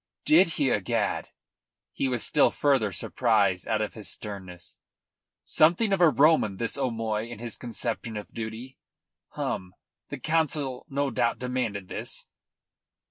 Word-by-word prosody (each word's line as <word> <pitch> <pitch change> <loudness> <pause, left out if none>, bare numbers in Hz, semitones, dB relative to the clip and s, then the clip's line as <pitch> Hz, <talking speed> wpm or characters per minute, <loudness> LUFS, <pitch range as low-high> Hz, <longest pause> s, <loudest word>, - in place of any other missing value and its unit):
"Did 305 -11 +6
he, 135 -3 +2
egad!" 100 -4 0 0.7
He 135 - -1
was 125 -3 -1
still 150 - +4
further 135 -8 +1
surprised 100 -1 +1
out 110 -1 +1
of 105 - -5
his 110 -2 -4
sternness. 95 -4 -8 0.6
"Something 175 +7 +3
of 190 - +1
a 170 - +8
Roman 140 -7 +3
this 115 +2 -2
O'Moy 115 -4 -2
in 120 - -7
his 115 +1 -6
conception 115 -2 -4
of 105 - -8
duty! 115 +3 -7 0.5
Hum! 90 0 -4 0.3
The - - -5
Council 150 -5 -1
no 140 0 -1
doubt 115 +1 +1
demanded 125 -6 -3
this?" - - -4
120 Hz, 135 wpm, -27 LUFS, 105-140 Hz, 0.7 s, a